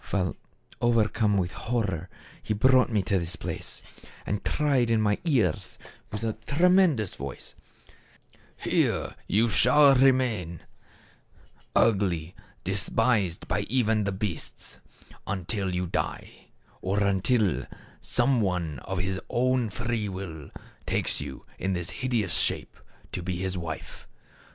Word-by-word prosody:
While 95 Hz, -3 st, 0 dB, 0.5 s
overcome 110 Hz, -3 st, +3 dB
with 90 Hz, -2 st, 0 dB
horror 110 Hz, -9 st, -2 dB, 0.3 s
he 105 Hz, -, -2 dB
brought 130 Hz, +4 st, +5 dB
me 105 Hz, -4 st, +1 dB
to 95 Hz, +1 st, +1 dB
this 85 Hz, 0 st, -3 dB
place, -, -, -5 dB, 0.4 s
and 105 Hz, 0 st, -2 dB
cried 140 Hz, -5 st, +2 dB
in 115 Hz, -1 st, +3 dB
my 105 Hz, -1 st, +2 dB
ears 115 Hz, -, +1 dB, 0.3 s
with 105 Hz, +2 st, -4 dB
a 110 Hz, -1 st, 0 dB
tremendous 170 Hz, -, +4 dB
voice, 70 Hz, 0 st, -7 dB, 0.6 s
' -, -, -32 dB, 0.2 s
Here -, -, 0 dB, 0.3 s
shall 135 Hz, +5 st, +6 dB
you -, -, +6 dB
remain, 115 Hz, -, +2 dB, 1.1 s
ugly, 95 Hz, -7 st, +2 dB, 0.3 s
despised 100 Hz, 0 st, 0 dB
by -, -, 0 dB
even 110 Hz, -4 st, +2 dB
the 100 Hz, -, 0 dB
beasts, 95 Hz, -3 st, -5 dB, 0.5 s
until 95 Hz, 0 st, -2 dB
you 90 Hz, 0 st, 0 dB
die; 85 Hz, -, -4 dB, 0.3 s
or 100 Hz, +2 st, 0 dB
until 100 Hz, -, +2 dB, 0.3 s
some 130 Hz, -4 st, +2 dB
one 85 Hz, -, -1 dB
of 95 Hz, +9 st, -5 dB
his 95 Hz, +1 st, -1 dB
own 125 Hz, -1 st, +1 dB
free 115 Hz, 0 st, -2 dB
will, 85 Hz, -6 st, -7 dB, 0.4 s
takes -, -, 0 dB
you -, -, -7 dB
in 95 Hz, 0 st, 0 dB
this 90 Hz, -1 st, -2 dB
hideous 115 Hz, -9 st, 0 dB
shape -, -, 0 dB, 0.4 s
to -, -, -3 dB
be 90 Hz, +1 st, -3 dB
his 95 Hz, +1 st, -2 dB
wife. 85 Hz, -3 st, -6 dB
105 Hz, 125 wpm, -27 LUFS, 90-120 Hz, 1.1 s, shall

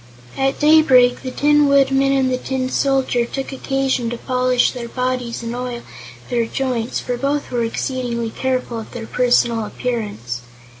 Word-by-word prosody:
At 270 Hz, 0 st, 0 dB
daybreak 270 Hz, -5 st, +5 dB
the 260 Hz, -, -4 dB
Tin 295 Hz, +2 st, +3 dB
Woodman 275 Hz, -1 st, +3 dB
and 265 Hz, -1 st, +2 dB
the 255 Hz, -, 0 dB
Tin 260 Hz, -1 st, -2 dB
Soldier 265 Hz, -3 st, +1 dB
took 270 Hz, +3 st, -5 dB
occasion 270 Hz, -3 st, -1 dB
to 240 Hz, -, -4 dB
polish 250 Hz, 0 st, +1 dB
their 240 Hz, -2 st, -6 dB
bodies 250 Hz, -2 st, -2 dB
and 230 Hz, +1 st, -4 dB
oil 245 Hz, -1 st, -5 dB, 0.5 s
their 235 Hz, -2 st, +1 dB
joints, 250 Hz, -2 st, -2 dB
for 245 Hz, -1 st, -3 dB
both 280 Hz, +3 st, -2 dB
were 240 Hz, -2 st, 0 dB
exceedingly 235 Hz, -1 st, -2 dB
careful 255 Hz, -2 st, -2 dB
of 220 Hz, -, -10 dB
their 230 Hz, -2 st, -6 dB
personal 240 Hz, -2 st, +2 dB
appearance. 205 Hz, -, -4 dB
250 Hz, 155 wpm, -19 LUFS, 235-270 Hz, 0.5 s, daybreak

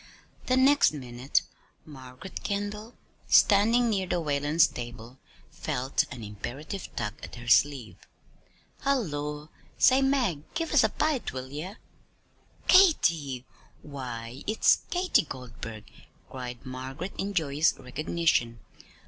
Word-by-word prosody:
The 255 Hz, -, +3 dB
next 275 Hz, -, +5 dB
minute, 125 Hz, -1 st, -1 dB, 0.4 s
Margaret 130 Hz, +4 st, -10 dB
Kendall, 210 Hz, +3 st, -4 dB, 0.3 s
standing 230 Hz, +4 st, +5 dB
near 195 Hz, -4 st, 0 dB
the 175 Hz, -, 0 dB
Whalens' 150 Hz, +1 st, +3 dB
table, 120 Hz, +1 st, -8 dB, 0.3 s
felt 135 Hz, -3 st, -1 dB
an 120 Hz, -2 st, -8 dB
imperative 135 Hz, -, -6 dB
tug 105 Hz, -, -2 dB
at -, -, -9 dB
her 120 Hz, -1 st, -10 dB
sleeve. 130 Hz, -2 st, +3 dB, 0.8 s
"Hullo! 150 Hz, -, -2 dB, 0.3 s
Say, 260 Hz, +1 st, +5 dB
Mag, 255 Hz, -, +1 dB
give 330 Hz, -1 st, -2 dB
us 295 Hz, -, +6 dB
a 220 Hz, -, +3 dB
bite; 300 Hz, +2 st, -1 dB
will 130 Hz, 0 st, -6 dB
ye?" 165 Hz, +8 st, -6 dB, 0.9 s
"Katy! 165 Hz, -, +4 dB, 0.4 s
Why, 125 Hz, -3 st, -7 dB
it's 215 Hz, +1 st, +4 dB
Katy 365 Hz, +1 st, +3 dB
Goldburg," 120 Hz, -6 st, -8 dB, 0.5 s
cried 125 Hz, 0 st, -7 dB
Margaret 130 Hz, +8 st, -6 dB
in 200 Hz, +1 st, -3 dB
joyous 155 Hz, -2 st, +2 dB
recognition. 130 Hz, -3 st, 0 dB
150 Hz, 115 wpm, -28 LUFS, 125-205 Hz, 0.9 s, us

